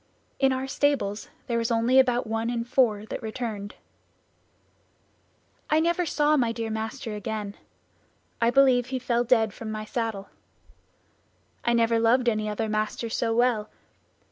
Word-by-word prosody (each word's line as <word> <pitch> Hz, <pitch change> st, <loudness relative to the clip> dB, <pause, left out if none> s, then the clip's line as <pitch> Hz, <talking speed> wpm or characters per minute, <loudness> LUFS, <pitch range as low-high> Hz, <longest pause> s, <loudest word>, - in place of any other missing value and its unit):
In 270 Hz, -1 st, +4 dB
our 260 Hz, 0 st, -1 dB
stables 270 Hz, -7 st, -1 dB, 0.2 s
there 235 Hz, -1 st, -1 dB
was 230 Hz, -, -1 dB
only 235 Hz, +3 st, +3 dB
about 250 Hz, -1 st, +3 dB
one 225 Hz, +1 st, -2 dB
in 235 Hz, -1 st, -1 dB
four 230 Hz, -4 st, +1 dB
that 220 Hz, -, -6 dB
returned. 220 Hz, -3 st, -5 dB, 1.9 s
"I 310 Hz, -, +4 dB
never 340 Hz, +2 st, +1 dB
saw 295 Hz, 0 st, +2 dB
my 240 Hz, -5 st, +2 dB
dear 225 Hz, -1 st, -4 dB
master 220 Hz, +1 st, -4 dB
again. 210 Hz, -1 st, -4 dB, 0.9 s
I 230 Hz, -, +4 dB
believe 255 Hz, -1 st, +4 dB
he 260 Hz, +1 st, -2 dB
fell 240 Hz, -1 st, 0 dB
dead 225 Hz, -4 st, +2 dB
from 220 Hz, +1 st, -7 dB
the 215 Hz, 0 st, -5 dB
saddle. 220 Hz, -3 st, -3 dB, 1.3 s
I 235 Hz, -, +2 dB
never 230 Hz, -1 st, +3 dB
loved 240 Hz, +2 st, +3 dB
any 215 Hz, -2 st, +1 dB
other 220 Hz, +1 st, -2 dB
master 215 Hz, +2 st, -2 dB
so 225 Hz, 0 st, 0 dB
well. 235 Hz, -3 st, +2 dB
230 Hz, 145 wpm, -26 LUFS, 220-255 Hz, 1.9 s, In